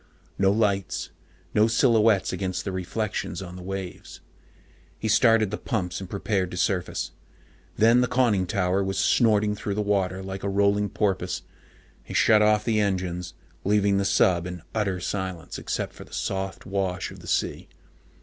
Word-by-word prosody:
No 95 0 +4
lights, 100 -3 0 0.4
no 105 +1 +4
silhouettes 115 -3 +3
against 95 -1 -3
the 100 - -2
reflections 95 -1 -3
on 90 -2 -8
the 90 - -8
waves. 95 0 -6 0.8
He 110 - -3
started 110 -1 +4
the 105 - -3
pumps 95 -8 -2
and 95 - -7
prepared 100 -2 -1
to 90 - -7
surface. 90 0 -1 0.7
Then 115 +3 +5
the 125 - +2
conning 115 -7 +2
tower 95 -1 +1
was 95 0 -2
snorting 105 -3 +3
through 100 -1 -4
the 105 - 0
water 95 -2 0
like 95 0 -6
a 100 - -2
rolling 100 +1 +2
porpoise. 100 -3 -1 0.6
He - - -8
shut 110 -1 +5
off 105 0 +3
the 110 -2 +2
engines, 90 -4 -2 0.3
leaving 100 0 +3
the - - +1
sub 90 -3 +3
in 90 -2 -7
utter 100 -4 0
silence 95 -2 -4
except - - -3
for - - -11
the - - -17
soft 95 0 -3
wash 95 -2 -2
of - - -11
the - - -12
sea. - - -1
100 Hz, 165 wpm, -25 LUFS, 95-105 Hz, 0.8 s, Then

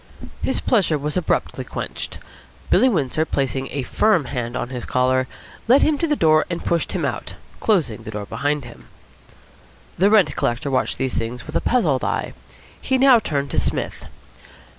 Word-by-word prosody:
His - - 0
pleasure 190 -10 +2
was 150 +1 -3
abruptly 180 - -1
quenched. - - -6 0.5
Billy 260 - +5
Windsor, 155 - 0
placing 135 -3 -2
a 140 0 -3
firm 175 - +2
hand 120 -2 -3
on - - -3
his 125 -2 -5
collar, 130 0 +1 0.4
led 260 +5 +6
him 310 - +3
to 335 - +1
the 300 - +2
door 155 - +4
and 170 -1 -4
pushed 170 -1 0
him - - -1
out, - - -4 0.2
closing 165 - +1
the - - -9
door 105 -1 -5
behind 145 +6 -2
him. 120 - -13 1.1
The 195 +3 +5
rent 210 -3 +4
collector 120 +4 -1
watched 130 - 0
these 130 -1 -2
things 120 +1 -4
with 155 - -9
a - - +2
puzzled 165 - +1
eye. - - -2 0.5
He 265 - +1
now 260 -2 +6
turned 140 -8 -2
to - - +1
Psmith. - - -3
145 Hz, 175 wpm, -21 LUFS, 130-195 Hz, 1.1 s, led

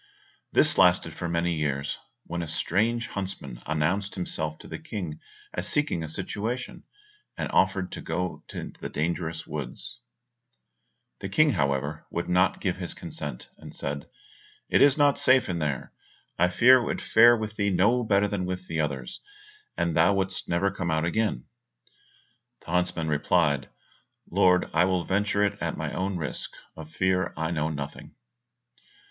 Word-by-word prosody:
This - - +4
lasted - - +4
for 85 - -4
many 85 +1 +1
years, 70 -3 -2 0.2
when 85 0 -4
a 85 - -4
strange 115 +9 +1
huntsman 95 -11 -5
announced 90 +6 0
himself 80 -4 -2
to - - -12
the - - -6
King 85 -8 -5 0.3
as 90 +3 -1
seeking 150 - +1
a 80 - -5
situation, 110 +8 -4 0.5
and - - -3
offered 95 -1 +2
to - - -6
go 90 +2 -3
into - - -7
the - - -4
dangerous 80 0 -2
forest. - - -5 1.2
The 95 - -5
King, 155 +9 +4
however, 70 - -1
would 85 - -3
not 90 +1 +2
give - - -1
his - - -3
consent, - - -6
and - - -11
said, 70 +1 -4 0.6
"It - - +4
is 140 +1 +6
not 145 -1 +4
safe 130 0 +5
in 90 -2 -2
there; 75 -4 -3 0.4
I 90 - +3
fear 125 +9 +7
it 120 - -3
would - - -2
fare 120 +1 +6
with 110 -1 -5
thee 100 -1 +1
no 105 +7 +3
better 100 -2 +3
than 100 -3 -2
with 90 0 -4
the 80 -3 -3
others, 70 -5 -3 0.6
and 85 -1 0
thou 85 +4 +4
wouldst 95 0 0
never 95 +3 +1
come 90 -3 -3
out 80 0 +1
again." 95 - 0 1.2
The - - -9
huntsman 90 -2 0
replied, 75 -2 +1 0.6
"Lord, 90 0 +4
I 85 - +4
will 90 -2 +1
venture 100 +2 +1
it 100 0 0
at - - -2
my - - -3
own 95 0 -1
risk, 80 -5 -4 0.2
of 80 -1 -10
fear 95 +1 0
I 80 +1 -1
know 80 -2 0
nothing." 75 -2 -7
90 Hz, 165 wpm, -27 LUFS, 80-100 Hz, 1.2 s, fear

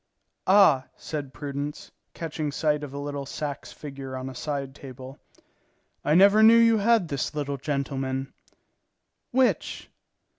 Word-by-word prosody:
"Ah," 185 -10 +5
said 145 -4 -5
Prudence, 145 +1 -5 0.2
catching 155 -2 -3
sight 150 0 0
of 145 - -6
a 140 - -7
little 145 -1 -4
Saxe 145 -1 -5
figure 135 -3 -7
on 130 +1 -5
a - - -10
side 135 +1 -4
table, 130 -1 -10 0.8
"I 150 - +2
never 200 +4 +7
knew 225 +1 +8
you 230 -1 +5
had 220 -3 +3
this 140 +1 -3
little 140 -1 -2
gentleman." 135 -1 -3 1.0
"Which?" 255 0 0
145 Hz, 135 wpm, -26 LUFS, 135-160 Hz, 1.0 s, knew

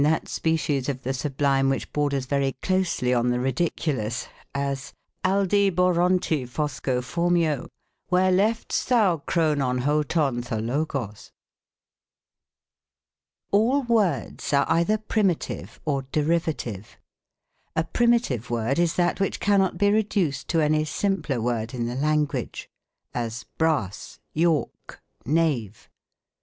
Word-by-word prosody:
19 150 - +4
that - - -7
species 150 -4 0
of 130 -2 -4
the 130 - -1
sublime 135 0 +1
which 135 - -2
borders 140 -3 0
very 135 0 0
closely 185 -9 +1
on 120 0 +2
the 125 0 +1
ridiculous; 130 -3 -1 0.3
as, 140 0 -3 0.2
" - - -51
Aldiborontiphoscophormio, 175 - +1 0.4
Where 185 +1 +3
left's 210 +5 +1
thou 215 -9 +3
Chrononhotonthologos? 135 - -1 2.2
All 240 +8 +3
words 205 - 0
are 140 0 +4
either 170 +6 +3
primitive 210 -5 -1
or 140 -3 0
derivative. 155 - -1 0.8
A 160 - +2
primitive 235 - +1
word 120 +5 0
is 170 -1 +2
that 175 0 +1
which 195 - -1
cannot 195 -2 +2
be 205 0 +3
reduced 195 -10 0
to 165 -2 +2
any 155 0 +2
simpler 155 -5 -1
word 115 0 -2
in 120 -1 -2
the 120 - -3
language; 150 +1 -1 0.5
as, 115 -1 -4
brass, 150 - -1 0.2
York, 160 -1 -1 0.3
knave. 140 - 0
150 Hz, 105 wpm, -25 LUFS, 130-180 Hz, 2.2 s, 19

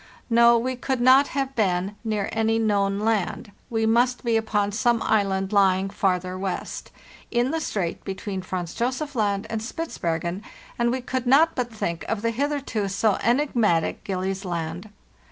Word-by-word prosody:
No, 235 0 +6
we 255 +2 -1
could 255 +1 -2
not 260 +3 +6
have 270 -1 -1
been 190 -2 0
near 215 -3 -1
any 225 0 +1
known 200 -2 +1
land; 215 -1 -1 0.2
we 225 -1 0
must 245 +3 +2
be 235 -2 +1
upon 210 -2 +1
some 235 +3 +2
island 195 -2 +1
lying 195 -1 +3
farther 185 -2 -1
west, 190 -1 -4 0.4
in 240 +2 +1
the 325 - -1
strait 185 - -3
between 195 0 -4
Franz 180 -2 -4
Josef 260 +5 -2
Land 205 -2 0
and 220 -1 -2
Spitzbergen; 175 - -3 0.4
and 235 0 +3
we 255 +2 -1
could 255 0 -3
not 315 +6 +5
but 245 -2 -2
think 170 -6 -3
of 225 -1 -3
the 230 - +1
hitherto 270 -5 -1
so 200 +2 +1
enigmatic 235 - +1
Gillies 190 0 -3
Land. 170 +2 -4
215 Hz, 160 wpm, -24 LUFS, 195-240 Hz, 0.4 s, No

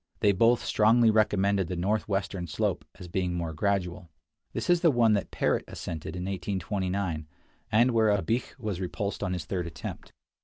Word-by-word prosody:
They 105 - +5
both 115 +5 +3
strongly 115 +1 +4
recommended 100 -3 +2
the 90 - -3
northwestern 95 -1 -1
slope - - -1
as 90 - -9
being 90 0 -1
more 85 -2 -3
gradual. 90 -1 -1 0.4
This - - -4
is 175 -1 +4
the 170 - +5
one 120 -5 +4
that 100 - 0
Parrot - - 0
ascended 80 0 -6
in 90 - -4
1 95 - -3
829, 95 -3 -2 0.4
and 120 +3 +4
where 110 -2 +3
Abich 105 +5 0
was 105 -7 -4
repulsed 100 +2 -3
on 90 -3 -1
his 90 -4 -4
third 90 -3 -2
attempt. 85 - -7
100 Hz, 170 wpm, -28 LUFS, 90-110 Hz, 0.4 s, They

